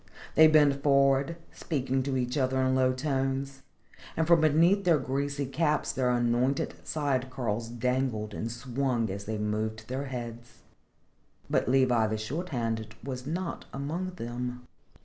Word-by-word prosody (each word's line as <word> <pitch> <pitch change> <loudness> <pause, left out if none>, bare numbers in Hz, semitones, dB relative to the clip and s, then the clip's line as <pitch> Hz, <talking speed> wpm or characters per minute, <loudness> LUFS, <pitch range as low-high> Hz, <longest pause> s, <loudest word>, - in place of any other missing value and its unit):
They 160 - +8
bent 145 -3 +4
forward, 140 +3 +3
speaking 135 -4 -1
to 130 0 -1
each 125 0 -1
other 130 -2 +1
in 130 0 +2
low 130 -1 +3
tones, 135 0 -2 0.6
and 160 - +2
from 170 0 +5
beneath 165 +6 +4
their 170 -4 +4
greasy 140 +1 -2
caps 150 +3 0
their 130 -2 0
anointed 120 +2 +1
side 135 -4 -1
curls 115 -3 -3
dangled 120 -3 -1
and 115 +3 -4
swung 120 -2 -1
as 100 +1 -6
they 110 0 -3
moved 110 +1 -3
their 135 +2 -3
heads. 120 -2 -7 0.9
But - - +2
Levi 125 -4 +3
the 110 0 -2
Short 150 +12 -4
handed 115 -4 -3
was 130 -1 -5
not 170 +2 -3
among 165 +7 -3
them. 125 -1 -5
130 Hz, 150 wpm, -29 LUFS, 120-140 Hz, 0.9 s, They